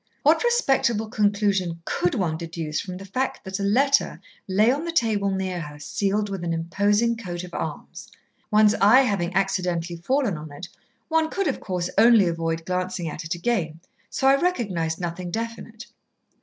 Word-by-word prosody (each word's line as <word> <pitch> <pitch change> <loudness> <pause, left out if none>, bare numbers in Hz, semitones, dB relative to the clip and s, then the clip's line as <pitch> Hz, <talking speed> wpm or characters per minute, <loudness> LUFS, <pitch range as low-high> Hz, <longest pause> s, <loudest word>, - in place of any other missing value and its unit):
"What - - +4
respectable 270 - +2
conclusion 200 -5 +1
could 175 - 0
one 170 -6 0
deduce 165 -2 -4
from 180 -2 -7
the 195 - -9
fact 255 +7 -3
that 190 0 -5
a - - -2
letter 275 +8 +2 0.3
lay 210 +5 +4
on 285 +4 -2
the 335 - -3
table 220 -9 +1
near 190 -2 -2
her, 150 -2 -8
sealed 200 +7 -1
with 195 -3 -5
an 170 -1 -1
imposing 205 +8 +1
coat 180 -6 -6
of 180 - -10
arms. - - -6 0.4
One's 210 -1 +5
eye 220 +7 +6
having 200 -8 0
accidentally 180 -3 -1
fallen 225 - 0
on 155 0 -9
it, 160 +5 -8 0.4
one 320 -1 +1
could, 395 +3 -2
of 270 - -1
course, 180 -2 -3
only 225 -3 +6
avoid 165 -1 -2
glancing 185 -1 -2
at 150 - -6
it 160 +3 -3
again, 170 -5 -1 0.3
so - - -2
I 275 +1 +5
recognised 190 - -1
nothing 175 0 -4
definite. 230 +2 -6
195 Hz, 170 wpm, -24 LUFS, 170-230 Hz, 0.4 s, eye